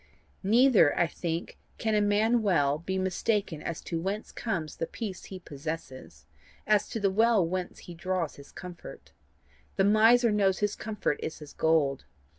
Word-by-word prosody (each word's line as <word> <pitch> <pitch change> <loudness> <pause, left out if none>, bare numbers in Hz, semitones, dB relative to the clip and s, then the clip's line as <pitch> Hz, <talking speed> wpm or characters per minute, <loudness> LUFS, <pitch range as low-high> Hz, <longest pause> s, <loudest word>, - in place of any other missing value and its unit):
Neither 220 - +5
I 175 - +4
think 165 0 -4 0.2
can 220 -1 -1
a 210 - +3
man 215 +3 +3
well 150 -8 +2
be 190 +3 -3
mistaken 190 -2 -1
as 170 +1 -4
to 165 -1 -4
whence 200 +4 -3
comes 170 -10 -4
the 165 - -2
peace 200 -5 -6
he 190 - -8
possesses, 155 -4 -7 0.4
as 210 -1 +2
to 230 - -3
the 200 -2 +2
well 220 -3 +3
whence 180 +1 -4
he 175 - -10
draws 175 -1 -2
his 140 0 -13
comfort. 180 -2 -10 0.6
The 195 - +2
miser 225 +3 +5
knows 195 -3 +2
his 205 -1 0
comfort 210 -8 -2
is 160 - -4
his 150 -2 -11
gold. 155 -4 +1
190 Hz, 165 wpm, -28 LUFS, 165-210 Hz, 0.6 s, Neither